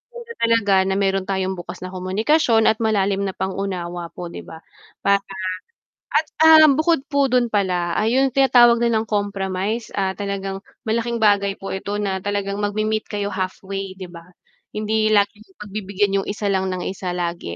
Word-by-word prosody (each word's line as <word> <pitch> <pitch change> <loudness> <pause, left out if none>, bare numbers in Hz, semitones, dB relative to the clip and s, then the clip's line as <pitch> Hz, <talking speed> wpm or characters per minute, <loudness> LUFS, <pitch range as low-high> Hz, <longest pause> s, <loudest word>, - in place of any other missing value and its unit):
maganda 470 -1 -8
talaga 230 -3 +2
na 190 - 0
meron 195 -1 0
tayong 190 -1 -1
bukas 175 - -8
na 185 - -6
komunikasyon 220 - +2
at 220 - 0
malalim 200 -2 +1
na 190 - -5
pang-unawa 185 -3 -4
po' 175 -1 -7
di - - -7
ba? 160 - -11 0.4
Para 200 0 +4 1.0
at, 310 - +3 0.2
ah, 315 -1 +9
bukod 310 +3 +3
po 280 -1 +3
dun 250 -1 +3
pala 180 -4 0
ay 225 +4 +1
yung 270 - +4
tinatawag 240 -3 +6
nilang 225 -2 +1
compromise, 205 +1 -2
ah, 190 -1 0
talagang 195 -1 -4 0.3
malaking 230 +2 0
bagay 200 -1 +3
po 195 - -6
ito 200 +2 -4
na 195 -2 -1
talagang 200 0 -2
magmemeet 215 +1 -1
kayo 205 -1 -3
halfway 190 +1 -4
'di 185 -2 -9
ba? 170 -1 -12 0.5
Hindi 215 0 0
lagi 205 +1 +1 0.2
pagbibigyan 200 -1 -2
yung - - -12
isa 205 0 -3
lang 190 -1 0
ng 180 -1 -4
isa 185 -1 -4
lagi, 170 - -4
200 Hz, 170 wpm, -21 LUFS, 190-220 Hz, 1.0 s, ah